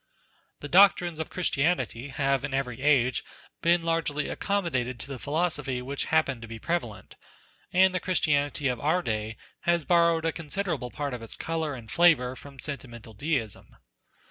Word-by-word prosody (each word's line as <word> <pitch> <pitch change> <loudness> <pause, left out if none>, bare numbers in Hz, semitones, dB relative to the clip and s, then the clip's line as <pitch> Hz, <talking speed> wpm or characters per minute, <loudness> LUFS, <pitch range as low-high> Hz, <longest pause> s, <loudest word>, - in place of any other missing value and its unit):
The 145 - -5
doctrines 175 -1 +5
of 160 - -3
Christianity 140 -7 0
have 135 -1 0
in 145 -2 -2
every 130 -2 -3
age 130 -4 +3 0.4
been 170 0 +3
largely 165 -3 -1
accommodated 130 -12 -1
to - - -6
the 135 -2 -6
philosophy 150 -4 -1
which 135 +3 -3
happened 140 -6 +1
to 115 - -8
be 115 0 -7
prevalent, 120 - -4 0.6
and 190 +1 +5
the 185 - 0
Christianity 145 -6 +1
of 125 -2 -1
our 165 +5 +1
day 110 0 -3 0.2
has 170 -3 +1
borrowed 170 -2 +3
a 165 - +2
considerable 160 -4 -3
part 145 +1 -4
of 125 - -5
its 115 - -9
colour 160 -3 -2
and 115 -3 -10
flavour 150 -8 +4
from 140 +1 -13
sentimental 120 -6 -7
deism. 120 -3 -3
145 Hz, 160 wpm, -27 LUFS, 125-165 Hz, 0.6 s, doctrines